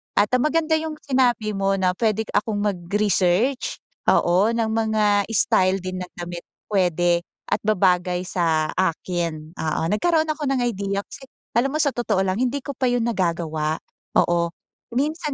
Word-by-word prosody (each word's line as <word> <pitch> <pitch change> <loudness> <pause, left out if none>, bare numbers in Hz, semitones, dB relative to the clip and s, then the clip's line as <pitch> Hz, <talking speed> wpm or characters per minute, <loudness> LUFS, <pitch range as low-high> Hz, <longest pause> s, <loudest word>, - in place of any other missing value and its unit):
At, 205 +1 +3
ah, - - -3
maganda 315 +2 +2
yung 315 0 -3
sinabi 245 -6 +1
mo 195 0 +1
na 185 -1 +2
pwede 220 -1 +1
akong 205 0 0
mag 205 -3 0 0.2
research, 210 +5 +1 0.3
oo 190 +6 +3
ng 225 -1 0
mga 215 -2 +2
style 190 -2 +3
din 185 0 -4
ng - - -23
damit 175 0 -7 0.3
pwede, 175 -2 +2 0.3
at - - +1
babagay 180 -3 +2
sa 165 -4 0
akin, 170 -2 -2
oo. 160 0 -1
Nagkaroon 320 +7 +2
ako 305 -1 -2
ng 255 - 0
idea, 200 -3 -1
kasi 270 - -12 0.3
alam 270 +4 +2
mo 310 - +1
sa 285 - +3
totoo 220 -6 0
lang 185 +1 -1
hindi 255 +2 0
ko 280 - -4
pa 260 - 0
yun 245 -1 +1
nagagawa. 165 -5 -1 0.5
Oo 170 0 0 0.4
minsan 300 +3 -1
205 Hz, 160 wpm, -23 LUFS, 180-245 Hz, 0.5 s, At